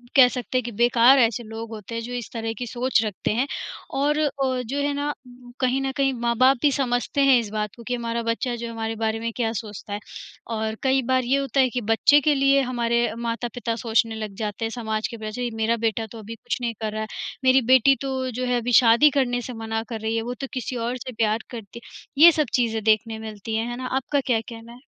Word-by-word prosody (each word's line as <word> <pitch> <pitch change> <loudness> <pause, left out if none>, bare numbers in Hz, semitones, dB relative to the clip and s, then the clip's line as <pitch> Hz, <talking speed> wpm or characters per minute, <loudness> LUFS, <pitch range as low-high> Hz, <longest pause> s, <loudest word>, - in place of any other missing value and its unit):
कह 255 -2 +9
सकते 250 0 -3
हैं 255 - 0
कि 240 - -5
बेकार 240 +4 +5
ऐसे 235 0 +2
लोग 225 +1 -7
होते 220 +1 -7
हैं 230 - -2
जो 240 +2 -7
इस 245 -3 -5
तरह 225 -1 -3
की 245 - -4
सोच 250 0 +1
रखते 210 0 -2
हैं 245 +4 +1 0.5
और 295 +2 +2
अ, 270 -4 0
जो 275 +5 -3
है 285 0 0
ना 290 +1 -2 0.5
कहीं 260 +1 +1
न 270 - -1
कहीं 270 -1 +2
माँ-बाप 255 +3 +4
भी 290 -2 +4
समझते 260 +1 0
हैं 260 - +7
इस 220 -3 -4
बात 210 -2 -3
को 235 - -12
कि 250 - 0
हमारा 235 -1 -3
बच्चा 240 +1 -1
जो 235 0 -6
है 230 - -6
हमारे 225 0 -3
बारे 220 0 0
में 230 0 -3
क्या 230 -3 0
सोचता 210 -1 -8
है। 205 - -3 0.6
और 220 0 -2
कई 265 0 +3
बार 255 0 +3
ये 260 +3 +2
होता 275 0 -1
है 260 - +5
कि 245 0 -3
बच्चे 285 +6 +5
के 295 +1 +3
लिए 275 0 +4
हमारे 235 -1 +1
माता-पिता 235 0 -3
सोचने 225 -1 +1
लग 215 -2 -6
जाते 215 +1 -3
हैं, - - -2
समाज 220 -2 -2
के 230 - -8
पीछे 225 +3 -4
मेरा 225 +1 +1
बेटा 225 0 0
तो 230 - -9
अभी 220 +2 -8
कुछ 225 - -4
नहीं 235 -1 -1
कर 215 - -2
रहा 215 - -3
है, 220 - -4 0.4
मेरी 260 0 +5
बेटी 265 +2 +6
तो 265 -1 -2
जो 255 +2 -3
है 250 0 +1
अभी 245 +1 -3
शादी 235 +6 +6
करने 245 -2 0
से 250 - -7
मना 225 0 -2
कर 225 -2 -4
रही 220 +1 -1
है, 225 - 0
वो 245 +2 -4
तो 270 - -3
किसी 255 0 -4
और 250 - -2
से 255 +1 -7
प्यार 220 -1 +1
करती 235 0 -9
है, - - -15 0.3
ये 340 - +11
सब 305 -3 0
चीज़ें 225 -3 +1
देखने 220 +1 +1
मिलती 220 0 -6
हैं, 225 +1 -1
है 240 - -5
ना? 255 0 -4
आपका 275 +2 0
क्या 235 -4 +1
कहना 230 0 -10
है? 240 - -14
235 Hz, 250 wpm, -24 LUFS, 225-255 Hz, 0.6 s, ये